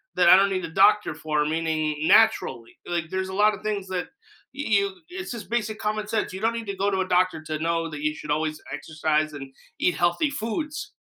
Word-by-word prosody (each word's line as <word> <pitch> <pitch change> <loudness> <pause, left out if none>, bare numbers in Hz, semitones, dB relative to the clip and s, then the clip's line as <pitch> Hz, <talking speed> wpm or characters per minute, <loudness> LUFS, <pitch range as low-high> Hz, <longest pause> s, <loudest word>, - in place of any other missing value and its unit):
that 180 - +4
I - - +10
don't 195 +1 +4
need 185 -2 -2
a - - -7
doctor 195 0 +4
for, 150 -1 -1
meaning, 155 -1 -1
naturally, 220 - +3
like 170 -2 -2
there's 190 +1 -2
a - - -6
lotta 210 +1 +2
things 205 -3 -2
that 180 -1 -3 0.4
you 280 +2 -6
you 200 -2 +1
it's 360 0 -6
just 235 -4 -7
basic 220 -2 -1
common 215 0 -2
sense, 215 -3 -1
you 190 - -5
don't 225 +1 +2
need 230 -1 -5
to 200 - -3
go 200 +1 +1
to 190 -1 0
a 185 - -2
doctor 185 -1 +2
to 155 -1 -4
know 165 +1 0
that 150 -2 -7
you 150 0 0
should 150 - -6
always 155 +1 -1
exercise 155 +1 -1
and 135 -2 -9 0.3
eat 180 - +2
healthy 175 - +1
foods. 290 - -4
185 Hz, 225 wpm, -25 LUFS, 155-215 Hz, 0.4 s, I